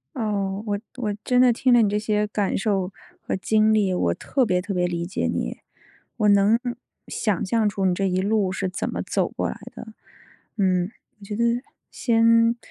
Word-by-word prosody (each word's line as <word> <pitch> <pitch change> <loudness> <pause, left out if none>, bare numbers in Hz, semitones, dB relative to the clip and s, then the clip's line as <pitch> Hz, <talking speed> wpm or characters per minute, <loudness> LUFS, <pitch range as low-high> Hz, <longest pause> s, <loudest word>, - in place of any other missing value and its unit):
哦， 200 -4 -2
我 205 -1 -1 0.2
我 215 -5 -2
真 250 -1 +2
的 250 -2 +5
听 255 +2 +2
了 240 - +6
你 210 - +3
这 210 - 0
些 210 0 0
感 205 -1 -1
受 195 -2 0 0.3
和 - - -3
经 215 +3 +2
历， 200 -3 +2
我 85 - +1
特 260 - 0
别 180 -3 +1
特 195 +2 -4
别 180 -1 +1
理 170 -1 -2
解 190 - -2
你， - - -2 0.6
我 210 -3 +2
能 200 +3 +5 0.5
想 210 -6 -1
象 220 +2 +1
出 200 -1 -2
你 185 - +3
这 195 +1 0
一 185 +1 0
路 205 -1 +1
是 190 0 -2
怎 185 - -3
么 - - -3
走 - - 0
过 - - -3
来 - - -7 0.2
的， 230 - -9 0.7
嗯， 185 -2 +1 0.3
我 - - -12
觉 205 +1 -5
得 235 - +1 0.5
先 230 0 +3
205 Hz, 210 characters per minute, -23 LUFS, 190-220 Hz, 0.7 s, 了